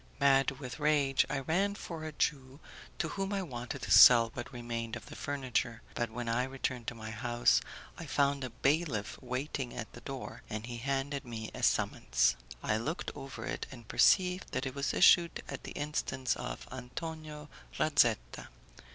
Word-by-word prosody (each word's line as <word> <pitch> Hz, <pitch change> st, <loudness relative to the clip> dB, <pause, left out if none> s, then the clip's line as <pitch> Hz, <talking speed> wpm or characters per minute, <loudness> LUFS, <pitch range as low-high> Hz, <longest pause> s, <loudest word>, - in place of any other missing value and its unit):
Mad 135 Hz, -1 st, +5 dB
with 130 Hz, +1 st, -7 dB
rage, 145 Hz, -3 st, +3 dB
I 135 Hz, -, -1 dB
ran 195 Hz, +8 st, +1 dB
for 165 Hz, -5 st, -7 dB
a 155 Hz, -, -4 dB
Jew, 140 Hz, -2 st, -2 dB, 0.4 s
to 160 Hz, -, -1 dB
whom 195 Hz, 0 st, -3 dB
I 195 Hz, -1 st, -1 dB
wanted 120 Hz, -7 st, -6 dB
to -, -, -4 dB
sell 115 Hz, -2 st, +9 dB
what 120 Hz, +1 st, -6 dB
remained 120 Hz, -2 st, -4 dB
of -, -, -8 dB
the -, -, -10 dB
furniture, 130 Hz, -4 st, -2 dB
but 120 Hz, -1 st, -1 dB
when 120 Hz, +1 st, -5 dB
I 115 Hz, +2 st, +1 dB
returned 130 Hz, -2 st, -3 dB
to 120 Hz, -, -3 dB
my 110 Hz, -1 st, -7 dB
house 120 Hz, +2 st, +2 dB, 0.4 s
I -, -, -7 dB
found 140 Hz, -1 st, +1 dB
a 130 Hz, -, -3 dB
bailiff 135 Hz, -4 st, 0 dB
waiting 130 Hz, 0 st, -3 dB
at -, -, -6 dB
the -, -, -11 dB
door, -, -, -7 dB
and 110 Hz, +1 st, -4 dB
he 120 Hz, 0 st, -6 dB
handed 140 Hz, +3 st, -2 dB
me 115 Hz, -3 st, -6 dB
a -, -, -7 dB
summons. 60 Hz, 0 st, +2 dB, 0.3 s
I 105 Hz, -, +1 dB
looked 150 Hz, +10 st, -3 dB
over 135 Hz, -1 st, -7 dB
it -, -, -4 dB
and 120 Hz, -4 st, -12 dB
perceived 180 Hz, -1 st, +3 dB
that -, -, -1 dB
it 130 Hz, -, -3 dB
was 140 Hz, +1 st, -1 dB
issued 170 Hz, -2 st, +5 dB
at -, -, -7 dB
the -, -, -6 dB
instance 145 Hz, -3 st, -1 dB
of -, -, -6 dB
Antonio 150 Hz, +4 st, -7 dB, 0.3 s
Razetta. 120 Hz, -, +2 dB
135 Hz, 175 wpm, -32 LUFS, 120-150 Hz, 0.4 s, sell